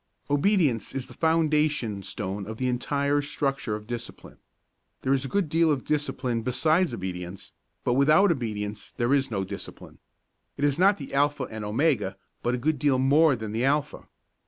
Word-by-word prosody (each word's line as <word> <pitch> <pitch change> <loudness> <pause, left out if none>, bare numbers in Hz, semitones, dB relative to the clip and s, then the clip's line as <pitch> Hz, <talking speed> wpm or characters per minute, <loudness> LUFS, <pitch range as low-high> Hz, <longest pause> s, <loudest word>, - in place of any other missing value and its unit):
Obedience 145 - +2
is 135 -2 -2
the - - -12
foundation 150 -9 +1
stone 100 0 -5
of 110 0 -6
the 130 - -1
entire 140 +3 0
structure 135 -5 -2
of 105 0 -8
discipline. 120 0 -7 0.6
There 135 - +2
is 135 0 0
a - - -2
good 200 +2 0
deal 160 +1 +3
in 140 -3 0
discipline 130 -5 -1
besides 155 +8 +2
obedience, 90 -3 -6 0.3
but 120 - +1
without 155 +9 +5
obedience 105 -7 -4
there 120 +3 0
is 135 -1 +2
no 100 -4 -1
discipline. 100 +1 -9 0.6
It 145 - +1
is 145 +2 +1
not 195 +2 +5
the 140 - -9
alpha 145 0 +2
and 110 -1 -6
omega, 105 -3 0 0.2
but 120 +1 0
is - - -2
a - - -8
good 150 +1 0
deal 140 -2 +3
more 140 +3 +4
than 110 -3 -6
the 115 +3 -1
alpha. 145 +2 0
135 Hz, 180 wpm, -26 LUFS, 110-150 Hz, 0.6 s, without